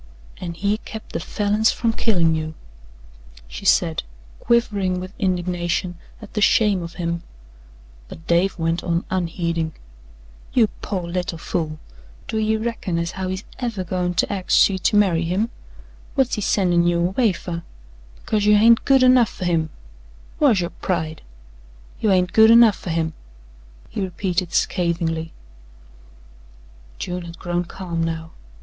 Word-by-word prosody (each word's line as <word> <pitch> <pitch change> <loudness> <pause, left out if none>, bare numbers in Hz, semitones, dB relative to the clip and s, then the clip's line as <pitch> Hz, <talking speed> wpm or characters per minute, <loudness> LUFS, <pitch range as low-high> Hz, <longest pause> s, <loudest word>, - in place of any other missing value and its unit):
"An' 170 -2 -6
he 205 +4 0
kept 220 -1 -10
the - - -1
Falins 210 +2 +1
from 230 -1 0
killin' 175 -9 +2
you," 155 0 -3 0.9
she - - -9
said, - - +3 0.4
quivering 200 -6 +1
with 185 +1 -7
indignation 175 -1 -1 0.3
at 210 - -12
the 210 - -1
shame 205 -3 +4
of 170 0 -7
him, 170 -1 -2 0.9
but 160 - -12
Dave 175 +3 +2
went 165 0 -1
on 170 0 -1
unheeding: 170 -3 -1 0.8
"You 230 -4 +4
pore 185 -4 -3
little 175 -1 -3
fool! 160 -2 -3 0.5
Do 220 - -2
ye 220 0 +1
reckon 220 -6 -3
as 170 +1 -1
how 190 0 -4
he's 190 +2 -4 0.2
EVER 230 -7 -2
goin' 180 0 -2
to 185 - +1
axe 190 -2 +4
ye 190 - -2
to 195 - +1
marry 185 -5 +3
him? 190 +8 -1 0.6
Whut's 265 -3 +2
he 210 - -1
sendin' 175 -4 +2
you 175 0 +2
away 220 +2 +2
fer? 170 -1 -5 0.5
Because 210 - -1
you 210 0 +6
hain't 230 +2 +6
good 270 -1 +5
enough 255 -3 +6
fer 185 - -6
him! 165 -3 +1 0.7
Whar's 245 -11 +4
yo' 175 - -2
pride? 160 -4 -2 0.8
You 215 - +1
hain't 185 -2 +2
good 220 0 +7
enough 230 -3 +7
fer - - -7
him," 160 -1 -1 0.7
he - - -5
repeated 180 -1 -2
scathingly. 165 -3 0 1.7
June 180 0 -4
had 170 0 -9
grown 175 0 -2
calm 170 -2 -4
now. 160 0 -4
180 Hz, 150 wpm, -22 LUFS, 170-210 Hz, 1.7 s, good